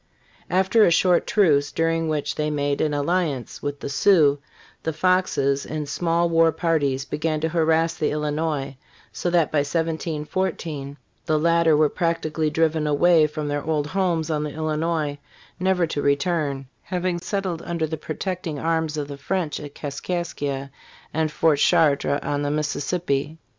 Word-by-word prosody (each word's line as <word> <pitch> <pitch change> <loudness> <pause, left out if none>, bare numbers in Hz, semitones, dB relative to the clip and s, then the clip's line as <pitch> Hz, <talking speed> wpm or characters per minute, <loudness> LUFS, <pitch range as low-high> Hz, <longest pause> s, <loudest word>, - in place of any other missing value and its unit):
After 190 +4 +4
a - - +6
short 175 +1 +3
truce, 150 -9 +3
during 165 0 0
which 150 -2 -1
they 150 0 -1
made 145 -1 -1
an 155 - +1
alliance 145 -3 -1
with 145 0 -4
the - - -4
Sioux, 145 -1 +4 0.4
the 160 - -2
Foxes, 155 -5 +1
in 155 -1 -4
small 170 +3 0
war 165 -1 +4
parties, 145 -5 0
began 155 +1 -2
to 160 - 0
harrass 165 0 +2
the 155 - -1
Illinois, 150 -2 -2 0.3
so 175 - -2
that 170 -3 +2
by 155 - +2
1714 160 -1 -2 0.3
the 155 -2 +2
latter 165 0 +3
were 155 0 +5
practically 160 -1 -1
driven 160 0 +1
away 155 +2 +4
from 150 0 -5
their 145 0 -2
old 150 -2 0
homes 170 -2 0
on 150 -1 0
the 150 - -3
Illinois 155 -1 -1 0.4
never 185 -1 +2
to 150 -2 -3
return, 140 -1 0 0.2
having 180 -1 -2
settled 185 -2 -3
under 170 -2 -2
the 160 +1 -3
protecting 170 0 -4
arms 160 0 -1
of 145 -1 -3
the 140 -1 -8
French 170 +1 -2
at 145 -1 -9
Kaskaskia 145 -2 -4 0.4
nnd 160 0 +1
Fort 155 -1 +2
Chartres 145 -4 +3
on 145 0 -1
the 145 - -1
Mississippi. 150 0 -1
155 Hz, 155 wpm, -23 LUFS, 145-170 Hz, 0.4 s, a